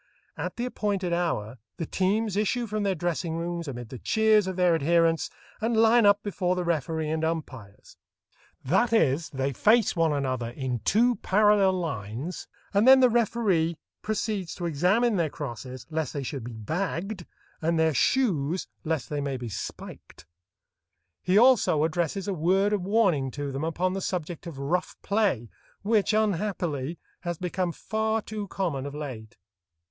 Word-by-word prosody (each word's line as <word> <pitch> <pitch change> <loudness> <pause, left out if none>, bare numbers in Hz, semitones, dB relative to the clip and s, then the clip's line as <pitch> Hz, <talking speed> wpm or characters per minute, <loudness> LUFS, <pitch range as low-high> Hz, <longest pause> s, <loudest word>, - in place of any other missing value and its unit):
At - - -4
the 240 - -2
appointed 200 -7 -1
hour 130 -10 -2 0.2
the 165 - -3
teams 200 +4 0
issue 215 +4 0
from 215 -1 -3
their 200 -2 +1
dressing 170 -1 -2
rooms 170 0 -3
amid 120 -4 -6
the 130 - -8
cheers 220 -2 +3
of 190 - -3
their 180 -1 +3
adherents 165 +1 +2 0.3
and 225 +1 +1
line 225 0 +5
up 205 +1 +4
before 185 -3 -1
the 180 - -1
referee 160 -1 -1
and 160 0 -1
umpires. 130 -11 -5 0.7
That 230 - +2
is, 160 -7 +2
they 135 -1 -2
face 215 - +3
one 165 -2 +2
another 130 -5 -1
in 125 -1 -3
two 230 - +2
parallel 205 -1 +4
lines, 140 - -4 0.3
and 205 +4 +3
then 265 0 +9
the 255 -2 +5
referee 205 -8 +1 0.2
proceeds 210 -3 -2
to 175 - -5
examine 190 +9 +2
their 165 -3 +1
crosses 130 -2 -7
lest 160 -3 -2
they 140 - -3
should 135 -2 -5
be 120 - -7
"bagged," 175 - -3 0.3
and 165 +1 +1
their 160 -1 +3
shoes 180 - +1 0.2
lest 160 -5 -2
they 145 -1 -3
may 140 -2 -2
be 120 -2 -6
spiked. 90 - -8 1.0
He 185 +2 +2
also 230 - +5
addresses 170 +4 -1
a 200 - 0
word 190 +5 +2
of 205 - 0
warning 185 -9 +2
to 145 -1 -3
them 135 +3 -4
upon 175 +3 0
the 195 - -3
subject 175 -2 -4
of 160 -5 -8
rough 165 +7 -1
play, 200 - 0 0.3
which, 210 0 +2
unhappily, 180 -8 -1 0.2
has 175 -2 -4
become 180 0 -2
far 220 +4 -1
too 210 -1 -5
common 160 -8 -2
of 145 - -7
late. 130 -8 -7
175 Hz, 165 wpm, -27 LUFS, 145-205 Hz, 1.0 s, then